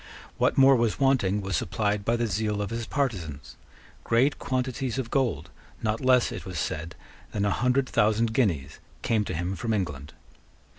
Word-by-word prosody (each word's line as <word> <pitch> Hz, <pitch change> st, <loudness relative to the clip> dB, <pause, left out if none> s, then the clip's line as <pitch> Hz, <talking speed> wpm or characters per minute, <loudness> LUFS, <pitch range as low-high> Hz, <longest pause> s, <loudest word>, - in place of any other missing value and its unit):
What -, -, +2 dB
more 135 Hz, 0 st, +7 dB
was 115 Hz, -1 st, 0 dB
wanting 120 Hz, -8 st, +2 dB
was 95 Hz, -1 st, -2 dB
supplied 105 Hz, +3 st, -1 dB
by 115 Hz, +3 st, +1 dB
the 120 Hz, 0 st, 0 dB
zeal 105 Hz, 0 st, -1 dB
of 105 Hz, 0 st, -3 dB
his 115 Hz, 0 st, -4 dB
partisans. 85 Hz, -, -3 dB, 0.5 s
Great 125 Hz, +5 st, +2 dB
quantities 130 Hz, -2 st, -2 dB
of 125 Hz, -3 st, -3 dB
gold, 110 Hz, -, 0 dB, 0.3 s
not 110 Hz, 0 st, 0 dB
less, 130 Hz, -2 st, +4 dB
it -, -, -6 dB
was 90 Hz, -3 st, -6 dB
said, 80 Hz, +1 st, -3 dB, 0.4 s
than 100 Hz, 0 st, 0 dB
a 100 Hz, -, +1 dB
hundred 125 Hz, +3 st, +1 dB
thousand 110 Hz, 0 st, +2 dB
guineas, 85 Hz, -, 0 dB, 0.2 s
came 110 Hz, -2 st, +2 dB
to -, -, -4 dB
him 90 Hz, +3 st, -2 dB
from 115 Hz, +6 st, -2 dB
England. 75 Hz, -8 st, -4 dB
110 Hz, 170 wpm, -27 LUFS, 95-125 Hz, 0.5 s, more